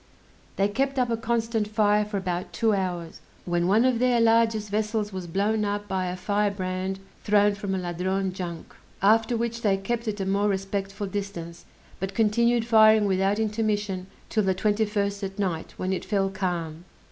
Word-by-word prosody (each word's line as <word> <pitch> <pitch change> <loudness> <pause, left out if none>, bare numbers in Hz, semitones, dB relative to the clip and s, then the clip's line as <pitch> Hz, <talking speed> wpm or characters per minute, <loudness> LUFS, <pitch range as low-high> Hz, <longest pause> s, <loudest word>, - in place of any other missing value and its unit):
They 195 - +2
kept 270 +6 -1
up 250 -2 +1
a - - +2
constant 225 -1 -1
fire 210 -1 +3
for 210 -1 -3
about 180 -2 -3
two 225 -2 +2
hours, 180 -4 -3 0.2
when 175 0 0
one 215 +6 +4
of 255 -3 +2
their 250 -1 +3
largest 225 -2 +3
vessels 215 -1 -1
was 185 -2 -5
blown 205 +5 0
up 205 0 -2
by 190 -2 -1
a 180 - -3
firebrand 190 -1 -1 0.3
thrown 205 0 +4
from 200 -1 -3
a - - -1
Ladrone 185 +2 -2
junk; 175 -3 -6 0.3
after 225 +3 +4
which 235 0 -2
they 200 -3 +2
kept 235 +4 -3
at 210 -1 -2
a 195 - -1
more 200 +2 +1
respectful 195 +1 -3
distance, 190 -4 -6 0.3
but 190 +1 -4
continued 235 +2 +2
firing 220 -2 +6
without 195 +1 +1
intermission 210 -3 -1 0.2
'till 220 - +1
the 190 -2 +1
21st 205 0 0
at 195 0 -5
night, 180 -5 -3
when 185 +1 -1
it 185 - -3
fell 195 -2 0
calm. 175 -4 -3
205 Hz, 175 wpm, -26 LUFS, 190-220 Hz, 0.3 s, firing